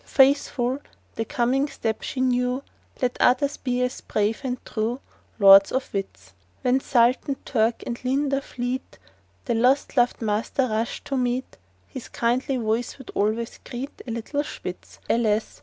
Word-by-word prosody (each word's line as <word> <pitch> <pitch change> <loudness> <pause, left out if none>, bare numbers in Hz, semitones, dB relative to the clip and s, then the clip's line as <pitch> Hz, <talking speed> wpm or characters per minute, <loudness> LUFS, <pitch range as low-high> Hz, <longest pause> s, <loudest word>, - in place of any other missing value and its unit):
Faithful 265 -2 +3 0.3
the 225 - -2
coming 255 +5 +1
step 225 -6 -3
she 260 - -3
knew 250 +1 +1 0.4
Let 250 0 0
others 280 +3 +3
be 250 -1 -1
as 250 0 -3
brave 210 +1 -1
and 255 -1 -2
true— 225 +3 -2 0.4
Lords 195 -2 +8
or 260 - +2
Wits! 190 - -5 0.3
When 250 +1 +3
SULTAN, 255 +2 +2
TURK, 230 -1 +1
and 235 0 -5
LINDA 275 +2 +1
fleet 250 0 -4 0.5
The 240 - 0
lost 255 +6 +2
lov'd 245 -2 +3
Master 225 +4 0
rushed 220 +2 -2
to 275 - -2
meet, 250 +1 -1 0.3
His 260 - -8
kindly 255 +3 0
voice 230 +1 -1
would 265 - -10
always 220 +3 -1
greet 270 +3 -7
The - - -10
little 235 +6 -2
Spitz! - - -8
Alas! 220 -2 +1
245 Hz, 150 wpm, -24 LUFS, 225-265 Hz, 0.5 s, Lords